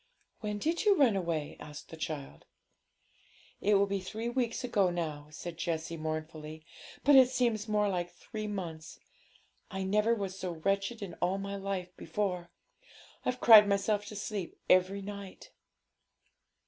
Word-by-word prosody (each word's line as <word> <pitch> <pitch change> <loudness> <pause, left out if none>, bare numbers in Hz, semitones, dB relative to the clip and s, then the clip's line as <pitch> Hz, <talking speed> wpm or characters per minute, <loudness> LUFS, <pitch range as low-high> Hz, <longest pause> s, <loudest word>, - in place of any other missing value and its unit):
'When 210 -1 -3
did 325 +10 0
you 415 -2 +5
run 255 -8 +5
away?' 165 -5 -2
asked 150 -1 -10
the - - -8
child. 150 - -6 1.2
'It 205 +1 +4
will 200 0 +5
be 200 0 -1
three 220 +5 -4
weeks 240 -1 -1
ago 205 -7 +2
now,' 155 -4 -3
said 165 +2 -8
Jessie 165 -1 -2
mournfully; 155 0 -5 0.4
'but 285 +1 +6
it 260 -2 +8
seems 235 -4 0
more 210 -1 +2
like 175 -3 -1
three 215 +2 -7
months. 170 -6 -6 0.7
I 190 -1 -3
never 210 +4 +2
was 195 -3 -4
so 185 -2 -4
wretched 195 +6 -1
in 180 -4 -6
all 180 +2 +1
my 200 0 -4
life 195 -2 -4
before; 180 0 -2 0.8
I've 255 0 -1
cried 215 -3 +9
myself 200 +1 +1
to 210 - -8
sleep 200 -3 -4
every 185 +2 +3
night.' 200 -1 -8
195 Hz, 150 wpm, -31 LUFS, 170-210 Hz, 1.2 s, cried